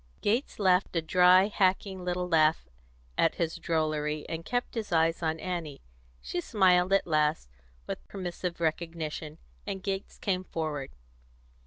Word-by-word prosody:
Gates 230 +7 0
laughed 185 -2 +2
a 165 - +2
dry, 180 +3 +6
hacking 190 -1 0
little 180 0 -1
laugh 160 -2 +3 0.5
at 165 - +3
his 165 0 -2
drollery, 155 -2 -1
and 165 0 -4
kept 245 +7 -2
his 220 -4 -4
eyes 165 0 +2
on 160 -1 -1
Annie. 170 -6 -5 0.4
She 175 - -3
smiled 185 -2 +3
at 195 - +3
last, 150 - +1 0.3
with - - -6
permissive 180 -2 -5
recognition, 160 -2 -3 0.3
and 195 -2 -4
Gates 195 0 -4
came 185 -2 -1
forward. 155 -6 -4
175 Hz, 140 wpm, -29 LUFS, 160-185 Hz, 0.5 s, dry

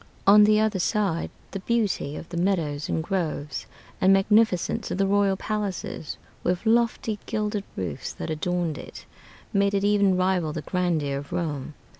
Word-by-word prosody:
On 210 +1 +8
the 215 0 +4
other 215 -3 +1
side, 195 -3 0 0.2
the 195 - -4
beauty 205 -9 0
of 165 - -7
the 175 - -7
meadows 165 -6 0
and 160 - 0
groves, 160 -6 -3 0.3
and 190 - +5
magnificence 210 +1 +3
of - - -2
the 195 - +2
royal 200 -1 +2
palaces, 205 -7 -4 0.3
with 180 +4 -1
lofty, 225 -2 +1
gilded 210 -1 -2
roofs 90 -6 -4
that - - -5
adorned 170 0 -1
it, - - -10 0.5
made 200 0 +2
it 195 - +1
even 200 -2 +3
rival 185 -4 +1
the 155 - -4
grandeur 160 -6 0
of 140 - -11
Rome. 150 -4 -3
190 Hz, 160 wpm, -25 LUFS, 160-205 Hz, 0.5 s, On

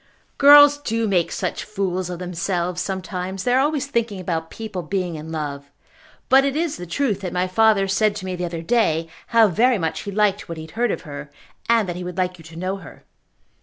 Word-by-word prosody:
"Girls 290 0 +8
do 230 -5 -1
make 180 -4 +1
such - - -3
fools 185 -3 -3
of 180 - -5
themselves 180 0 -2
sometimes. 190 0 -4
They 245 - +1
are 255 - +4
always 290 0 +1
thinking 235 -7 -2
about 165 -3 -3
people 215 -5 -6
being 180 +1 -2
in 155 +1 -7
love. 145 -3 -5 0.6
But 265 +1 +6
it 275 0 -1
is 320 -1 -1
the 180 - -8
truth 210 0 -1
that 185 -2 -4
my 180 +1 0
father 210 0 +3
said 205 +2 +2
to 185 - -6
me 185 -1 -3
the 180 0 -3
other 165 -1 -5
day 165 -7 +1 0.2
how 230 -2 +5
very 230 +6 +3
much 165 -4 -2
he 200 - -6
liked 205 -2 +1
what 165 - -5
he 160 - -6
had 160 - -12
heard 235 +6 0
of - - -3
her, 145 -2 -8 0.4
and 230 -4 +3
that 175 - -4
he 180 - -5
would 180 -1 -7
like 180 -1 -1
you - - -13
to 160 0 -12
know 185 +3 -3
her." 175 -5 -13
190 Hz, 225 wpm, -22 LUFS, 175-225 Hz, 0.6 s, Girls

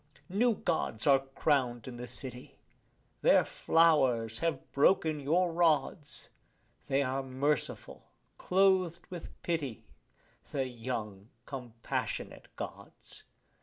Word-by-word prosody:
New 225 +5 +2
Gods 160 - -1
are 140 -2 +6
crowned 135 -3 0
in 125 -2 -7
the 125 +1 -6
city; 125 0 -8 0.6
their - - +5
flowers 130 -9 +3
have 160 -5 -2
broken 155 +1 +3
your 170 +5 +2
rods; 160 -2 +1 0.6
They 140 0 +2
are 135 +1 -1
merciful, 135 +2 -2 0.3
clothed 185 -2 +2
with 175 -3 -8
pity, 145 - -2 0.7
the 135 -2 -1
young 115 -4 -5 0.2
compassionate 120 -4 -5
Gods. - - -9
140 Hz, 100 wpm, -31 LUFS, 125-165 Hz, 0.7 s, are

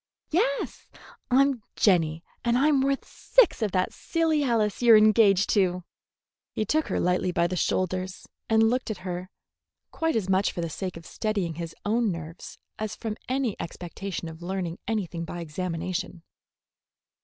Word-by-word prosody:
"Yes; - - 0 0.4
I'm 270 -1 +3
Jenny, 165 -5 +2 0.2
and 235 0 +2
I'm 280 0 +4
worth 275 0 0
six - - +3
of 215 -3 0
that 185 -1 +1
silly 325 -3 0
Alice 225 -5 +1
you're 235 -2 +8
engaged 215 -2 +5
to." 180 -3 +2 0.7
He 215 - -1
took 310 +8 +1
her - - -1
lightly 180 0 +1
by 170 -1 +2
the 180 +1 -1
shoulders 185 +1 -1 0.2
and 225 0 +5
looked 250 +2 0
at 215 - -3
her, 180 0 -4 0.6
quite 325 -1 0
as 210 -5 0
much 190 +1 +2
for 175 - -3
the 165 -1 -3
sake 185 +1 -4
of 165 - -12
steadying 200 -6 -2
his 165 0 -6
own 225 0 +2
nerves 165 0 -8 0.2
as 215 -1 -3
from 220 -2 -4
any 255 -5 0
expectation 175 +1 -5
of 160 +1 -9
learning 175 -1 -3
anything 185 -6 -2
by 175 +1 -6
examination. 170 +1 -4
195 Hz, 155 wpm, -26 LUFS, 175-235 Hz, 0.7 s, you're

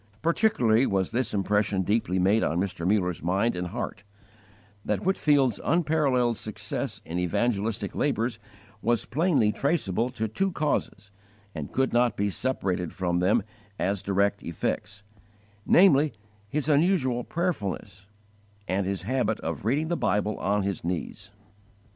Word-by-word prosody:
Particularly 135 - +3
was 95 -2 0
this 120 0 -1
impression 100 -1 +1
deeply 100 -2 0
made 100 +5 +3
on 80 - 0
Mr. 90 -3 -2
Muller's 90 -5 0
mind 95 +7 +1
and 90 0 -3
heart: 105 0 -5 0.8
that 105 - -1
Whitefield's 145 - +2
unparalleled 145 -8 +2
success - - -5
in 85 +2 -3
evangelistic 105 +4 -1
labours 120 -5 0 0.4
was 120 -1 +1
plainly 145 - +2
traceable 125 - 0
to 110 -3 -3
two 190 - -1
causes 105 -10 -2 0.4
and 75 -3 -6
could 130 -2 0
not 120 -1 +2
be 100 0 0
separated 95 -8 -2
from 90 -2 0
them 100 +5 +3 0.3
as 100 0 -1
direct 100 +1 +1
effects; 100 +4 -4 0.6
namely, 155 -5 +5 0.4
his 150 +3 -1
_unusual 145 -6 +2
prayerfulness, 100 - -3 0.6
and 95 0 0
his 95 -2 -2
habit 130 +5 0
of - - -4
reading 145 +8 +1
the 175 - +1
Bible 105 0 0
on 100 0 +1
his 100 -1 -3
knees. 90 +3 -4
110 Hz, 135 wpm, -27 LUFS, 95-130 Hz, 0.8 s, namely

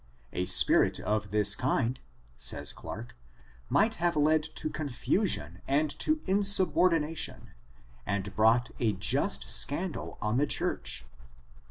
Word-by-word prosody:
A 90 0 -2
spirit 95 - +4
of 105 -1 -2
this 105 0 +4
kind 130 +1 0 0.4
(says 70 +3 +2
Clarke) 120 +2 -9 0.5
might 220 +2 +3
have 170 -1 +1
led 155 +1 +3
to - - -4
confusion 145 - -1
and 145 +2 +1
to 310 - +1
insubordination^ 185 -5 +1 0.5
and 100 -1 -3
brought 115 +3 +3
a 110 -5 +1
jxist 95 +2 0
scandal 165 +4 -1
on 105 +2 -1
the 145 +2 +2
church." 65 - -3
130 Hz, 120 wpm, -29 LUFS, 105-160 Hz, 0.5 s, spirit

